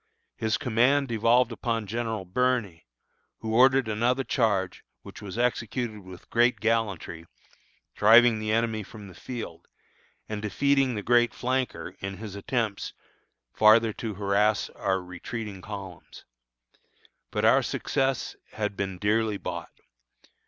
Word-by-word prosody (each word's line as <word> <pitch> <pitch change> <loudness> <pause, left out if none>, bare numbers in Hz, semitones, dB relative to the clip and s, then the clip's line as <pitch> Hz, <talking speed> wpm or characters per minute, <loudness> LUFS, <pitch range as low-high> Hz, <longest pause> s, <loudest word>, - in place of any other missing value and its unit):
His 110 -1 0
command 130 +4 +2
devolved 115 +2 +3
upon 115 -1 -2
General 110 -1 -3
Birney, 105 - -1 0.5
who 110 0 -3
ordered 130 +1 +5
another 120 +5 +1
charge, 100 -8 0 0.2
which - - -11
was 100 +1 -7
executed 120 -2 -1
with 95 -2 -13
great 120 -1 +3
gallantry, 100 -7 -1 0.7
driving 115 +1 +6
the 110 0 -2
enemy 110 -1 0
from 105 0 -11
the 95 - -12
field, 120 +4 -8 0.6
and 105 -1 -4
defeating 135 +4 +1
the 105 - -4
great 120 0 +3
flanker 130 +1 -2
in 95 0 -5
his 105 0 -8
attempts 110 0 -2 0.6
farther 110 +1 +5
to 110 -2 -5
harass 100 +2 +1
our 95 -1 -1
retreating 95 +3 -7
columns. 100 -3 -9 1.0
But - - -1
our - - +6
success 135 -1 -1 0.2
had 105 -2 -3
been 95 -2 -3
dearly 105 +2 +1
bought. - - -6
110 Hz, 125 wpm, -27 LUFS, 100-120 Hz, 1.0 s, driving